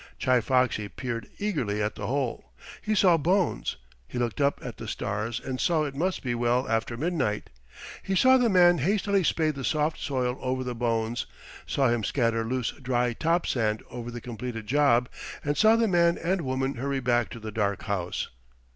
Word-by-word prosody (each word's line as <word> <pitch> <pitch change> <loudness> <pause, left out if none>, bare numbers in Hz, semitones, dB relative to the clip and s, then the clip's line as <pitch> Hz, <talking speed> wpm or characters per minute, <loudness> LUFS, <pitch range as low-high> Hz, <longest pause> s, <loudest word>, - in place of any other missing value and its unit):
Chi 125 -1 +3
Foxy 120 -3 +1
peered 115 -3 -5
eagerly 145 - -1
at 105 0 0
the - - -5
hole. 135 -2 -2 0.4
He 215 - 0
saw 185 -4 +5
bones. 175 - 0 0.3
He - - -7
looked 120 +2 -1
up 140 0 +2
at 125 - -6
the 115 - -7
stars 110 +3 -3
and 130 0 -4
saw 165 -3 +2
it 145 -2 -3
must 180 +7 -1
be 125 -2 -1
well 120 +2 +1
after 115 +1 -1
midnight. 140 -9 -1 0.5
He 190 - -2
saw 260 +6 +6
the 245 -2 +3
man 175 -3 +5
hastily 200 - +1
spade 155 -1 +1
the 135 -1 -6
soft 150 +5 0
soil 130 -3 -1
over 130 0 -1
the 125 -1 -3
bones, 115 -1 -1 0.4
saw 135 -3 +2
him 120 -2 0
scatter 115 -1 +1
loose 125 +1 -1
dry 125 -2 -1
top 165 +7 +1
sand 110 -3 0
over 120 0 -6
the 120 0 -7
completed 115 -1 -6
job, 125 -1 +3 0.4
and 145 0 +1
saw 220 +5 +5
the 230 0 +2
man 170 -3 +3
and 180 +2 0
woman 135 -1 -1
hurry 135 +2 -1
back 120 -2 +1
to 115 - -8
the 110 0 -6
dark 100 -2 -1
house. 90 -3 -2
130 Hz, 190 wpm, -27 LUFS, 115-160 Hz, 0.5 s, saw